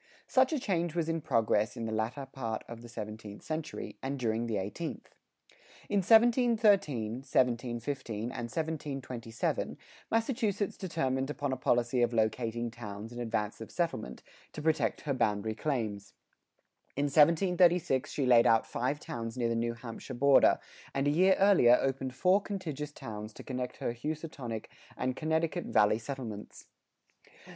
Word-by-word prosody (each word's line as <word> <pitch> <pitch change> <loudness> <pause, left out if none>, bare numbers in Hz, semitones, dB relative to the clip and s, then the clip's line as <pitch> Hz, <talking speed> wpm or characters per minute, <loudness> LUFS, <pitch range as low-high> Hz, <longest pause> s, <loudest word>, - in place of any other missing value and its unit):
Such 260 +2 +3
a 310 - +1
change 175 - -1
was 165 -2 0
in 165 0 -1
progress 110 -4 +1
in 115 - -3
the 110 - -3
latter 110 +6 -2
part 115 -5 -4
of 120 -1 -9
the 120 - -11
seventeenth 105 -2 -7
century 160 0 -5
and 135 +1 -3
during 115 -2 -1
the 110 -3 -1
eighteenth. 105 - -5 0.8
In 205 - +2
1713, 215 - +4
1715, 125 -1 -1 0.2
and 120 -2 -5
1727, 135 -8 -3 0.3
Massachusetts 225 -4 0
determined 135 -7 -1
upon 145 -2 -2
a - - 0
policy 120 0 +1
of 120 0 +2
locating 115 +1 0
towns 110 -1 -8
in 120 - -7
advance 115 -2 -2
of 110 - -7
settlement, 165 -11 -3 0.3
to 150 - -6
protect 160 0 +1
her 145 - -1
boundary 110 -3 0
claims. 110 -6 -3 0.8
In 140 - +1
1736 170 -1 +4
she 140 - -1
laid 120 -2 +6
out 115 0 +4
five 130 +5 -2
towns 115 -2 -5
near 120 -2 +1
the 115 - 0
New 115 0 -1
Hampshire 115 0 -8
border, 140 +2 +5 0.4
and 135 +1 +1
a - - +4
year 185 +5 +5
earlier 185 -12 +6
opened 135 -1 -2
four 185 +7 +4
contiguous 155 -8 -5
towns 105 -5 -7
to - - -10
connect 125 -1 -4
her 115 - -2
Housatonic 140 -4 -5 0.3
and 130 0 -1
Connecticut 160 +3 0
Valley 105 +1 +3
settlements. 115 -4 -7
130 Hz, 150 wpm, -31 LUFS, 115-160 Hz, 0.8 s, laid